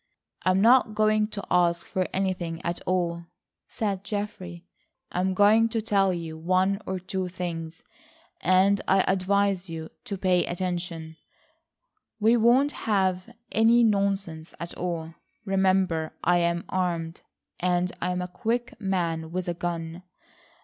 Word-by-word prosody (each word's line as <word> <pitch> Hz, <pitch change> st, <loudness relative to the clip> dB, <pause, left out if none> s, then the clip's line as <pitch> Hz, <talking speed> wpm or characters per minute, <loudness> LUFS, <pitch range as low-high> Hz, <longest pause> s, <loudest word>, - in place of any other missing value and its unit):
"I'm 185 Hz, +1 st, +2 dB
not 235 Hz, -1 st, +5 dB
going 215 Hz, 0 st, +3 dB
to 210 Hz, -2 st, -7 dB
ask 170 Hz, -1 st, +2 dB
for 185 Hz, -1 st, -1 dB
anything 180 Hz, -4 st, -2 dB
at 170 Hz, +1 st, -2 dB
all," 170 Hz, -2 st, 0 dB, 0.4 s
said 200 Hz, -3 st, -3 dB
Geoffrey. 190 Hz, -4 st, -5 dB, 0.5 s
"I'm 185 Hz, +1 st, 0 dB
going 215 Hz, +3 st, +5 dB
to 225 Hz, -, -1 dB
tell 200 Hz, -3 st, +2 dB
you 165 Hz, -3 st, -5 dB
one 185 Hz, +4 st, +1 dB
or 190 Hz, -, -2 dB
two 185 Hz, 0 st, -3 dB
things, 170 Hz, -2 st, -6 dB, 0.6 s
and 190 Hz, +3 st, +4 dB
I 195 Hz, 0 st, +4 dB
advise 195 Hz, 0 st, +1 dB
you 160 Hz, -1 st, -6 dB
to 200 Hz, -, -4 dB
pay 185 Hz, -2 st, +2 dB
attention. 175 Hz, -3 st, -4 dB, 1.0 s
We 225 Hz, +2 st, +4 dB
won't 245 Hz, +5 st, +4 dB
have 190 Hz, -6 st, 0 dB, 0.2 s
any 230 Hz, +2 st, +5 dB
nonsense 195 Hz, -6 st, 0 dB
at 170 Hz, -, -6 dB
all. 165 Hz, -2 st, -4 dB, 0.3 s
Remember 190 Hz, -4 st, +1 dB
I 175 Hz, +1 st, +4 dB
am 170 Hz, 0 st, 0 dB
armed, 170 Hz, -3 st, -2 dB, 0.4 s
and 180 Hz, 0 st, +1 dB
I 180 Hz, -, 0 dB
am 180 Hz, 0 st, -2 dB
a -, -, -4 dB
quick 235 Hz, +6 st, -3 dB
man 170 Hz, -5 st, -1 dB
with 180 Hz, 0 st, -3 dB
a 175 Hz, -, 0 dB
gun. 170 Hz, 0 st, -4 dB
185 Hz, 135 wpm, -26 LUFS, 170-200 Hz, 1.0 s, not